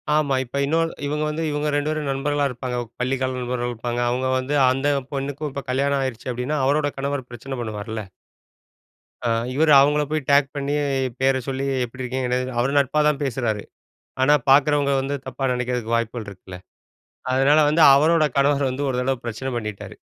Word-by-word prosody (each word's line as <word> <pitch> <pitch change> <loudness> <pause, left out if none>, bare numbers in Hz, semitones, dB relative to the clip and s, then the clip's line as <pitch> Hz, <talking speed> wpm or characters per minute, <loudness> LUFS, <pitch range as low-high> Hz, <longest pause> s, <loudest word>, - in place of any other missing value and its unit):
ஆமா, 145 -3 +2
இப்ப 130 +2 -6
இன்னொரு 165 +3 +1 0.2
இவங்க 150 +1 -1
வந்து, 155 +2 -3
இவங்க 150 +1 -1
2 145 +1 0
பேரும் 155 -2 -2
நண்பர்களா 145 +1 0
இருப்பாங்க. 125 0 -4 0.2
பள்ளிக்கால 130 0 -1
நண்பர்கள் 125 0 -2
இருப்பாங்க. 120 +1 -4
அவங்க 130 +2 -1
வந்து, 130 +3 -2 0.2
அந்த 140 +3 +1 0.2
பொண்ணுக்கும் 140 +2 -3
இப்ப 140 0 -6
கல்யாணம் 140 +2 +1
ஆயிருச்சு 130 -2 -4
அப்படின்னா, 125 +5 -2
அவரோட 145 +2 +2
கணவர் 140 -2 -3
பிரச்சன 130 +3 -7
பண்ணுவார்ல. 110 -2 -5 1.2
ஆ - - +1 0.2
இவர் 155 +3 +3
அவங்கள 145 +2 +4
போய் 155 0 0
டேக் 140 0 +5
பண்ணி, 140 0 -2 0.5
பேர 135 0 +3
சொல்லி 135 0 -2 0.2
எப்படி 130 +2 -8
இருக்கீங்க? 130 0 -2
என்ன 125 0 +1
இருக்கீங்க. 125 -1 -3
அவர் 135 +4 0
நட்பா 140 +2 +1
தான் 150 -1 0
பேசுறாரு. 120 -6 -2 0.6
ஆனா, 145 +3 +5
பாரக்கிறவங்க 140 +1 +4
வந்து 135 +2 -3
தப்பா 130 +1 -2
நெனைக்கிறதுக்கு 125 -2 -2
வாய்ப்புகள் 115 -1 -3
இருக்குல்ல. 95 -2 -10 0.7
அதனால 135 +4 +4
வந்து 160 +2 +2
அவரோட 155 +3 +4
கணவர் 140 -1 +2
வந்து 130 +3 -3
ஒரு 125 - -1
தடவ 135 +1 0
பிரச்சன 120 +3 -4
பண்ணிட்டாரு. 105 -3 -6
135 Hz, 170 wpm, -22 LUFS, 125-145 Hz, 1.2 s, டேக்